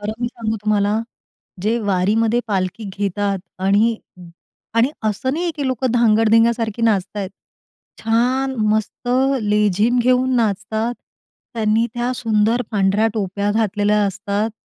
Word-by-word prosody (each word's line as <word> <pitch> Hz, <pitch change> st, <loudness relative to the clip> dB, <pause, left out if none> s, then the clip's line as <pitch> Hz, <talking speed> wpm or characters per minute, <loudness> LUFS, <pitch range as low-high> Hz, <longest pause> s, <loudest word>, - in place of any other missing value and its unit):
खरं 210 Hz, +1 st, -3 dB
मी 240 Hz, -, 0 dB
सांगू 225 Hz, -2 st, -3 dB
तुम्हाला, 210 Hz, 0 st, +1 dB, 0.6 s
जे 225 Hz, +3 st, +1 dB
वारीमध्ये 215 Hz, +4 st, +1 dB
पालखी 190 Hz, +2 st, -2 dB
घेतात 200 Hz, 0 st, -1 dB, 0.2 s
आणि 210 Hz, +4 st, +3 dB, 0.8 s
आणि 235 Hz, +5 st, +3 dB
असं, 215 Hz, +5 st, -1 dB
नाही 330 Hz, +4 st, -2 dB
आहे 340 Hz, -, -1 dB
की 285 Hz, -, -2 dB
लोकं 260 Hz, -1 st, -1 dB
धांगड-धिंग्या 225 Hz, 0 st, +4 dB
सारखी 230 Hz, -1 st, -3 dB
नाचताहेत. 200 Hz, -2 st, 0 dB, 0.7 s
छान, 250 Hz, +4 st, +1 dB, 0.2 s
मस्त, 220 Hz, +3 st, -2 dB, 0.3 s
लेझीम 210 Hz, +3 st, +2 dB
घेऊन 255 Hz, +1 st, +2 dB
नाचतात. 220 Hz, +1 st, -1 dB, 0.6 s
त्यांनी 220 Hz, +1 st, +1 dB
त्या 240 Hz, +1 st, -1 dB
सुंदर 225 Hz, 0 st, +1 dB
पांढऱ्या 205 Hz, +1 st, +2 dB
टोप्या 200 Hz, 0 st, -1 dB
घातलेल्या 210 Hz, -1 st, +1 dB
असतात, 200 Hz, +3 st, -2 dB
220 Hz, 125 wpm, -20 LUFS, 205-235 Hz, 0.8 s, धांगड-धिंग्या